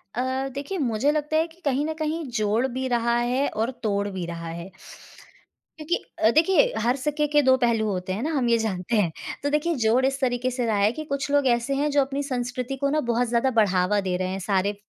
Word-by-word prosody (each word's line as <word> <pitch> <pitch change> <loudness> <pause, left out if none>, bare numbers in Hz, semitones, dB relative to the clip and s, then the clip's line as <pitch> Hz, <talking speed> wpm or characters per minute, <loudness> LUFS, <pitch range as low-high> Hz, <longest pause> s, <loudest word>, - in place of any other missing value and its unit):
अ, 260 +2 -1
देखिए 285 +8 -4
मुझे 265 -1 +1
लगता 305 +1 0
है 325 +1 +2
कि 335 +2 -22
कहीं 280 +1 +1
न 315 - -2
कहीं 315 +1 -2 0.2
जोड़ 215 +4 +1
भी 260 +1 -2
रहा 235 -1 +1
है 250 +3 +1
और 225 +4 -2
तोड़ 200 -1 0
भी 185 -3 -4
रहा 170 -1 -6
है। 170 +3 -7 1.1
क्योंकि 315 +3 -1 0.2
अ, 220 - +5
देखिए 325 +2 +4
हर 245 +3 +2
सिक्के 300 +2 -1
के 295 0 +3
दो 260 -2 +5
पहलू 230 -3 +1
होते 185 -1 -3
हैं 215 +7 -3
ना, 320 - -1
हम 245 -2 +1
ये 230 - +4
जानते 220 0 -2
हैं। 185 -6 +2 0.3
तो 285 - +1
देखिए 300 +3 0
जोड़ 250 +4 +3
इस 270 0 0
तरीके 250 0 0
से 250 -1 -2
रहा 220 -2 +1
है 200 +1 +3
कि 310 +5 -6
कुछ 280 -1 -3
लोग 285 -2 +3
ऐसे 240 +3 +1
हैं 300 - +1
जो 285 0 +4
अपनी 275 +1 -2
संस्कृति 250 +2 -3
को 280 - +2
ना 305 +2 +1
बहुत 245 +1 +1
ज़्यादा 240 +3 +2
बढ़ावा 195 +1 +2
दे 180 - 0
रहे 185 0 -2
हैं, 190 +1 -3
सारे 195 +1 0
250 Hz, 235 wpm, -25 LUFS, 215-285 Hz, 1.1 s, अ